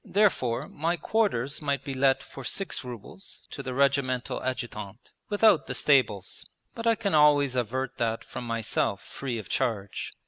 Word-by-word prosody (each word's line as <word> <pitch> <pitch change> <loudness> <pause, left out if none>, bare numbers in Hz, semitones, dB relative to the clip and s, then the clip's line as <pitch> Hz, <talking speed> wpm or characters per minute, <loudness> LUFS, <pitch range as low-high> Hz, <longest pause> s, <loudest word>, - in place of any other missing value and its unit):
Therefore 150 - +1
my 165 +4 -1
quarters 160 - 0
might 140 -2 -1
be 140 - -4
let 135 0 +3
for 135 - -10
six 190 +1 -2
rubles 125 - -10
to - - -6
the 130 -2 -5
Regimental 135 -2 +1
Adjutant, 120 -4 -5 0.2
without 205 -4 +4
the - - -3
stables; 125 -9 +2 0.3
but 230 0 -4
I 230 - +5
can 200 -3 -2
always 145 -3 +5
avert 130 +2 -2
that 115 -1 0
from 120 - -7
myself 115 -3 -1
free 130 -4 -5
of 110 - -7
charge. 105 -7 -2
135 Hz, 160 wpm, -27 LUFS, 120-150 Hz, 0.3 s, I